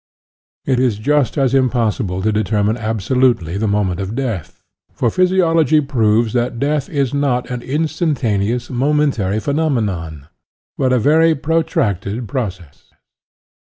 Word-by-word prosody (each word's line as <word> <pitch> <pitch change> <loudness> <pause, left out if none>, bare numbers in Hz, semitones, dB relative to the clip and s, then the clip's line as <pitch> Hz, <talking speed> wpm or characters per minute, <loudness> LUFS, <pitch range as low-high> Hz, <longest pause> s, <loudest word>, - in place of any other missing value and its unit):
It 130 -2 +1
is 125 -5 +1
just 145 +5 +1
as 135 -2 +2
impossible 115 -7 0
to 110 - +2
determine 105 0 0
abso 110 +1 -3
lutely 120 -10 +2
the 110 - 0
moment 100 -3 0
of 95 +3 -4
death, 120 - -4 0.3
for 115 - -1
physiology 165 -4 +3
proves 115 -5 +1
that 120 0 -1
death 145 +2 -1
is 140 -4 -1
not 135 -4 0
an 125 -1 -4
instantaneous, 130 - -1
momentary 130 -6 +1
phenomenon, 105 - -2 0.5
but 130 -1 0
a 130 - +3
very 160 +6 +3
pro 160 +3 +1
tracted 105 - -2
process. 95 - -6
120 Hz, 130 wpm, -18 LUFS, 105-145 Hz, 0.5 s, physiology